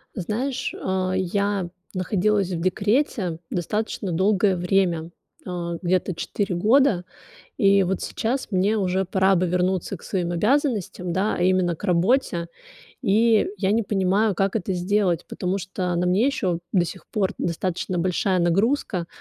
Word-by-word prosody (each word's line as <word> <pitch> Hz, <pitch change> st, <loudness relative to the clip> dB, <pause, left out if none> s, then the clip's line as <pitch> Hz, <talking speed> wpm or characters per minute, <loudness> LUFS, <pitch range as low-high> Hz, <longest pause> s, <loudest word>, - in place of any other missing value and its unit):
Знаешь, 245 Hz, +7 st, -2 dB
а, 185 Hz, 0 st, -1 dB
я 195 Hz, 0 st, -1 dB, 0.3 s
находилась 195 Hz, +1 st, +1 dB
в 165 Hz, -2 st, -3 dB
декрете 200 Hz, -, 0 dB
достаточно 205 Hz, +2 st, -2 dB
долгое 195 Hz, +2 st, +2 dB
время, 175 Hz, -2 st, +1 dB, 0.4 s
э, 170 Hz, -1 st, -4 dB
где-то 185 Hz, 0 st, 0 dB
4 190 Hz, +2 st, -2 dB
года. 215 Hz, 0 st, +3 dB, 0.6 s
И 200 Hz, -4 st, +5 dB
вот 190 Hz, 0 st, -1 dB
сейчас 250 Hz, +4 st, -2 dB
мне 195 Hz, +2 st, +2 dB
уже 190 Hz, 0 st, 0 dB
пора 190 Hz, +1 st, +2 dB
бы 180 Hz, -, +1 dB
вернуться 180 Hz, +2 st, 0 dB
к -, -, -19 dB
своим 175 Hz, -3 st, -2 dB
обязанностям, 210 Hz, -, 0 dB
да, 195 Hz, +5 st, 0 dB
а -, -, -1 dB
именно 180 Hz, -2 st, +2 dB
к -, -, -12 dB
работе. 180 Hz, -1 st, +1 dB, 0.5 s
И 220 Hz, -1 st, +3 dB
я 190 Hz, +1 st, +1 dB
не 225 Hz, +2 st, +2 dB
понимаю, 200 Hz, 0 st, +1 dB
как 195 Hz, +2 st, 0 dB
это 195 Hz, -2 st, -3 dB
сделать, 180 Hz, -1 st, 0 dB
потому 185 Hz, +2 st, -2 dB
что 185 Hz, -1 st, -3 dB
на 175 Hz, +1 st, 0 dB
мне 185 Hz, +6 st, +3 dB
ещё 190 Hz, -11 st, -1 dB
до 180 Hz, -3 st, +3 dB
сих 190 Hz, +2 st, -9 dB
пор 200 Hz, -4 st, 0 dB
достаточно 180 Hz, +1 st, -2 dB
большая 185 Hz, +2 st, +1 dB
нагрузка. 185 Hz, +1 st, +1 dB
190 Hz, 145 wpm, -23 LUFS, 180-210 Hz, 0.6 s, И